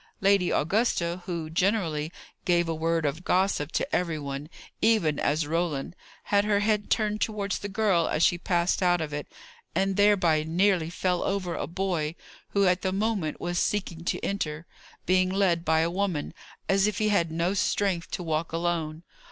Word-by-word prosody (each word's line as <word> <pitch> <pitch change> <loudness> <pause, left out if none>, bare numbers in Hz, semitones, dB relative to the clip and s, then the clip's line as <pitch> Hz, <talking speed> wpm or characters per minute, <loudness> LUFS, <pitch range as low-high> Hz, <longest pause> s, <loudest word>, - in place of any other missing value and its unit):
Lady 195 -2 +3
Augusta, 175 -1 0
who 170 -3 -3
generally 165 -3 0 0.3
gave 175 -1 +2
a 165 - -1
word 165 0 0
of 150 +5 -2
gossip 185 -6 +1
to - - -1
every 170 -3 0
one, 140 0 -5 0.3
even 210 -10 +3
as 150 +2 +1
Roland, 165 -1 -2 0.3
had 200 0 +2
her 205 -1 +2
head 210 -1 +1
turned 215 -1 0
towards 205 -3 -1
the 205 - -5
girl 195 -5 +2
as 155 - +1
she - - +4
passed 175 +1 +1
out 175 -1 +3
of 155 -2 -4
it, 145 0 -4 0.5
and 195 +1 +1
thereby 185 -7 +4
nearly 170 +1 +1
fell 180 0 -1
over 190 -3 -1
a - - -3
boy 170 -3 -2 0.3
who 200 -1 +2
at 180 0 +2
the 190 - 0
moment 195 -5 -1
was 175 0 -2
seeking 180 -5 -1
to - - -1
enter, 165 -5 -3 0.4
being 185 +1 +3
led 185 -3 +1
by 160 -1 +3
a 165 +1 0
woman, 185 -5 -2 0.3
as 195 +1 +3
if 210 -2 -2
he 215 -1 +1
had 170 -5 +2
no 170 +3 0
strength 195 -3 0
to 180 - -4
walk 160 0 -1
alone. 165 -1 -2
175 Hz, 175 wpm, -27 LUFS, 160-200 Hz, 0.5 s, she